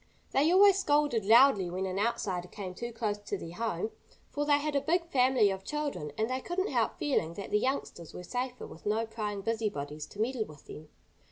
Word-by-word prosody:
They 295 +5 +3
always 390 +1 +6
scolded 290 - +2
loudly 225 -4 +6
when 185 +2 -2
an 190 +1 -2
outsider 195 -5 -1
came 185 -1 -7
too 235 +6 -5
close 215 -3 -2
to 205 0 -4
their 165 -2 -8
home, 220 0 -2 0.4
for 290 0 -1
they 290 -1 +5
had 295 0 -2
a 280 - +3
big 335 +4 +1
family 255 -8 +3
of 190 0 -5
children, 290 - -3
and 220 - +1
they 255 +1 -2
couldn't 375 +6 -2
help - - 0
feeling 170 - 0
that 200 - -7
the 210 - +3
youngsters 235 - -3
were 180 - -8
safer 250 +5 -4
with 165 - -10
no 220 +2 +1
prying 210 -2 -4
busybodies 155 -10 -3
to 205 - -14
meddle 230 0 0
with 150 -5 -14
them. 150 0 -10
225 Hz, 205 wpm, -30 LUFS, 190-275 Hz, 0.4 s, always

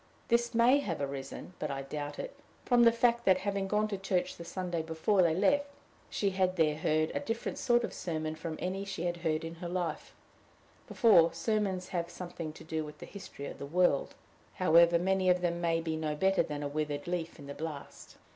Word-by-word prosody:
This 235 0 +2
may 245 +4 +5
have 180 - -3
arisen 140 +4 -5
but 150 - -2
I 135 0 -3
doubt 145 +1 -5
it - - -6 0.3
from 240 -1 +5
the 230 - +8
fact 235 0 +2
that, 190 -1 +5
having 195 0 -2
gone 210 +2 +1
to 200 -2 -3
church 190 -2 -1
the 170 - -9
Sunday 175 -1 -3
before 160 +5 +1
they 165 -3 +3
left, 285 +9 +3 0.4
she 200 -2 0
had 185 -1 +1
there 155 -3 +3
heard 155 0 +1
a - - 0
different 225 +10 -3
sort 240 -1 +3
of - - -3
sermon 155 -2 -3
from 160 0 -5
any 190 +2 -2
she 195 -3 -5
had 175 0 -1
heard 160 -2 -1
in 165 - -5
her 175 - -4
life 175 -3 -3 0.7
before: 175 -8 +5
sermons 190 +1 -1
have 170 -1 -2
something 175 -3 -6
to - - -12
do 160 -1 -3
with 150 0 -9
the - - -9
history 190 -8 -9
of - - -7
the - - -5
world, 175 -2 +2 0.4
however 170 -1 +5
many 190 +1 +2
of 180 0 +3
them 170 -1 -1
may 165 -1 +2
be 165 -1 -2
no 155 -1 -2
better 190 +4 +3
than 145 -1 -4
a - - -1
withered 145 0 -3
leaf 175 -1 -3
in 145 - -11
the 140 - -6
blast. 155 -2 -8
175 Hz, 210 wpm, -31 LUFS, 155-195 Hz, 0.7 s, the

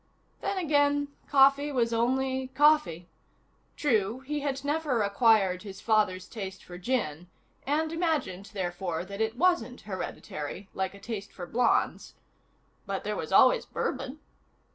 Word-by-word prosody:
Then 395 - -2
again, 290 -4 +2 0.2
coffee 280 +1 +5
was 235 -4 +1
only 260 +3 0
coffee. 295 - +3 0.7
True, 225 -3 +1
he 295 +3 -3
had 280 -1 -3
never 290 -6 +1
acquired 200 -3 +3
his 195 -1 -9
father's 200 -5 +1
taste 190 -3 -7
for 175 0 -10
gin 180 - -2 0.4
(and 310 +3 +1
imagined, 310 - -1
therefore, 175 -3 -3
that 200 +2 -6
it 220 +2 -1
wasn't 280 -8 +1
hereditary, 185 -2 -6
like 190 +1 -2
a - - -12
taste 205 -1 -6
for 180 - -7
blondes), 235 +6 +1 0.7
but - - -3
there - - -2
was - - -5
always - - +5
bourbon. 265 +4 -3
230 Hz, 135 wpm, -28 LUFS, 190-285 Hz, 0.7 s, coffee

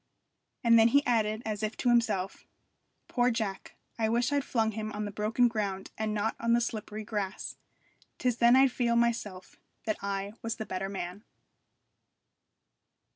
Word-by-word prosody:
And 230 -1 +6
then 225 - +7
he 280 +4 +3
added, 220 -2 +1
as 215 -1 -3
if 215 +1 -2
to 245 - +1
himself, 220 -6 +1 0.6
'Poor 245 -1 +2
Jack! 215 -5 -3 0.2
I 220 -1 +2
wish 240 +3 +1
I'd 285 -1 +1
flung 225 -4 0
him 215 0 -4
on 210 0 -3
the 205 - -4
broken 215 +4 +2
ground 200 -4 -3
and 220 0 -2
not 210 +1 -1
on 230 0 +2
the 235 - +5
slippery 215 -2 -4
grass. 205 -2 -4 0.6
'Tis 250 -2 0
then 240 +1 +6
I'd 265 0 +6
feel 235 -1 +1
myself 230 -6 -1 0.3
that 215 - 0
I 200 0 -3
was 230 0 -2
the 220 - -5
better 195 0 -3
man.' 190 +1 -5
220 Hz, 165 wpm, -30 LUFS, 205-235 Hz, 0.6 s, then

